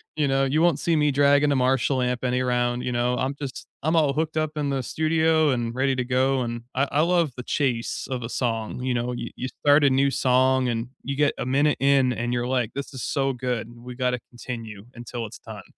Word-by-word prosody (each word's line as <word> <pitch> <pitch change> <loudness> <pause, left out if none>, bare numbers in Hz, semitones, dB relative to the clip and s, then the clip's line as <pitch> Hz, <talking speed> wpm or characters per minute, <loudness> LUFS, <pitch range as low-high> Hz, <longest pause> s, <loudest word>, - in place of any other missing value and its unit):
you 150 -2 +1
know, 135 0 +2
you 150 +4 +1
won't 170 -4 +3
see 170 -1 +1
me 150 -1 +3
dragging 145 +1 +4
a - - +2
Marshall 130 0 +2
amp 125 0 -2
any 125 0 +1
round. 120 0 0
You 125 - -2
know, 120 +1 0
I'm 130 +2 -1
just 140 -3 -6 0.2
I'm 160 +3 +1
all 150 -4 +3
hooked 155 +1 -2
up 155 -1 0
in 145 -1 -1
the 135 -2 -1
studio 160 +1 +2
and 120 -3 -1
ready 135 +1 +1
to 125 - -1
go. 130 +1 +1
And 120 -1 -4
I 135 +2 +2
I 150 - +2
love 170 -3 +2
the 125 - -6
chase 125 -5 -1
of 125 -1 -2
a 115 - -5
song, 115 -1 -2
you 130 -1 0
know? 120 +1 -1
You 120 - -5
you 130 - -4
start 145 +2 +3
a 140 - +6
new 135 +1 +2
song, 130 0 +2
and 115 0 -2
you 140 0 -3
get 145 0 +2
a - - -2
minute 145 +3 +2
in, 135 -2 +3
and 120 +1 -3
you're 120 0 -1
like, 125 -4 -1
"This 140 +1 -5
is 130 - -6
so 135 -2 0
good. 120 -2 -4
We 120 +1 -10
gotta 125 -1 0
continue 115 -4 -8
until 120 0 -6
it's 110 +1 -10
done." - - -10
130 Hz, 240 wpm, -24 LUFS, 120-140 Hz, 0.2 s, a